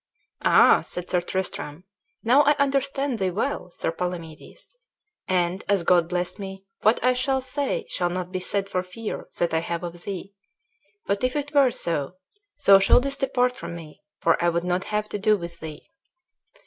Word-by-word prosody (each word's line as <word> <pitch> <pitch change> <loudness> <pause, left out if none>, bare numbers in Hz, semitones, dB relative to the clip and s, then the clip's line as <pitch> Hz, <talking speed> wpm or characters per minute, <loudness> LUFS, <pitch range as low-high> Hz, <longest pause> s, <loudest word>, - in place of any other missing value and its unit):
"Ah!" - - +6
said 180 0 -7
Sir 180 - +2
Tristram, 180 -3 -4 0.4
"now 250 +5 +5
I 295 0 +4
understand 275 -2 0
thee 190 -1 +1
well, 205 +1 -2
Sir 170 - -2
Palamedes; 170 - -7 0.5
and, 180 0 0
as 200 -3 +2
God 175 -1 +3
bless 180 +2 -2
me, 195 -1 -7 0.2
what 215 +3 +4
I 255 0 +4
shall 265 +1 +1
say 285 - -2
shall 175 - -1
not 180 0 -4
be 185 - -2
said 195 +2 -1
for 185 - -1
fear 185 +5 -6
that 175 -1 0
I 160 - +3
have 170 +1 -4
of 175 0 -6
thee. 195 0 -6 0.7
But 200 +2 -1
if 255 +2 +1
it 290 0 -3
were 280 -3 +6
so, 165 - -2 0.5
thou 195 -1 +9
shouldest 275 +8 +3
depart 250 -2 +1
from 170 -4 -7
me, 160 -3 -11 0.2
for 165 +1 +2
I 175 - +4
would 170 0 -1
not 180 +1 -1
have 210 0 -1
to 205 - -4
do 215 +1 +3
with 170 -2 -8
thee." 155 -1 -9
190 Hz, 180 wpm, -25 LUFS, 175-250 Hz, 0.7 s, thou